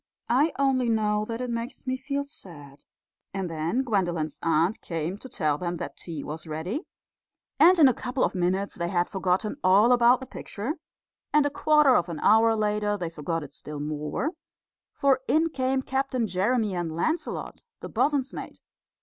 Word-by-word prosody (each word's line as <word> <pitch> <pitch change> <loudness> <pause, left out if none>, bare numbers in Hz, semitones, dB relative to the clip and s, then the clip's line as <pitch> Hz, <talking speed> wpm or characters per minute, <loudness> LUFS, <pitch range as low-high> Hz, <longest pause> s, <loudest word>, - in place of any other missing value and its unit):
"I 285 +7 +3
only 265 -3 +2
know 210 -1 +1
that 230 +2 -4
it 250 -1 -3
makes 235 +3 -5
me 260 0 0
feel 280 +1 -3
sad." 165 - -13 0.6
And 190 -3 -3
then 165 +11 -1
Gwendolen's 175 - -1
aunt 165 +5 +1
came 165 +3 -4
to 260 - -10
tell 155 -9 0
them 175 -1 -2
that 145 -4 -6
tea 160 -5 -6
was 160 +2 -7
ready, 165 - -4 0.7
and 350 +5 +7
in 305 -4 +8
a 260 - +4
couple 250 +2 -2
of - - +1
minutes 190 +2 0
they 170 -1 -3
had 175 -1 0
forgotten 190 +5 0
all 200 +6 +5
about 245 0 +5
the 265 - -7
picture; 245 0 -5 0.6
and 300 -1 +4
a 290 - 0
quarter 300 -3 +4
of 175 -4 +1
an 165 - -5
hour 225 +1 +5
later 210 -1 0
they 170 -3 -4
forgot 165 +1 -3
it 145 -1 -11
still 150 +1 -7
more, 150 - -2 0.6
for 275 -2 +2
in 320 +2 +3
came 265 -2 0
Captain 265 -2 -1
Jeremy 210 +3 0
and 170 -3 -3
Lancelot, 315 - -2 0.2
the - - -5
bosun's 280 -2 +1
mate. - - -8
210 Hz, 175 wpm, -26 LUFS, 170-260 Hz, 0.7 s, in